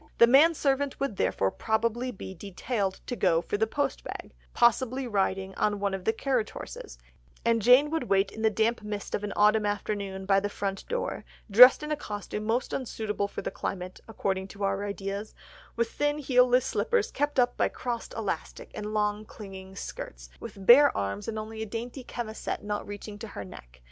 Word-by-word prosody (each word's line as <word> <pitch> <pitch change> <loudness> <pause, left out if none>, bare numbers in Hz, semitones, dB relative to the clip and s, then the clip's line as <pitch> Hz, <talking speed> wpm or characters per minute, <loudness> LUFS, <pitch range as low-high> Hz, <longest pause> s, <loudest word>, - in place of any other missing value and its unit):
The 235 - +8
man 290 +7 +6
servant 280 -1 0
would 275 -8 -2
therefore 95 +1 +1
probably 230 +3 -1
be 190 -4 -7
detailed 195 +2 -3
to 245 - -3
go 175 -7 +3
for 175 - -3
the 220 +2 +1
post 285 +5 -2
bag, - - -7 0.2
possibly 255 +2 +2
riding 195 -3 -1
on 205 0 0
one 200 -1 -1
of 190 -1 -4
the - - +4
carriage 245 -1 -1
horses; - - -9 0.5
and 230 -1 +3
Jane 255 +7 +6
would 320 -5 -1
wait 195 0 +3
in 220 - -8
the 220 - +4
damp 220 +2 +1
mist 210 -1 -5
of 205 - -1
an 205 - -3
autumn 210 0 +4
afternoon 200 -2 -3
by 195 0 +4
the 205 +1 -2
front 195 -1 -4
door, 485 +1 -3 0.3
dressed 250 +7 +9
in 300 - -4
a - - +2
costume 210 -4 -5
most 235 +3 0
unsuitable 215 -5 -2
for - - -7
the - - -3
climate, 185 -1 -5
according 195 -3 -2
to 200 +1 -8
our 195 0 0
ideas, 200 +1 -5 0.4
with 230 -1 0
thin 290 0 0
heel 255 -3 +4
less 250 +1 +3
slippers 475 - 0
kept 290 -1 0
up 245 0 +3
by - - +1
crossed 240 -2 -5
elastic, 215 -3 -4
and 210 0 -5
long 210 0 0
clinging 190 -3 -10
skirts, - - -7
with 195 -1 -9
bare 280 +6 +8
arms 100 0 -3
and 220 - -3
only 220 +1 -6
a - - -2
dainty 240 +4 -6
chemisette 230 -4 -5
not 205 0 -3
reaching 205 0 -8
to 225 - -6
her 100 - -7
neck. 60 -8 -13
215 Hz, 195 wpm, -28 LUFS, 195-245 Hz, 0.5 s, dressed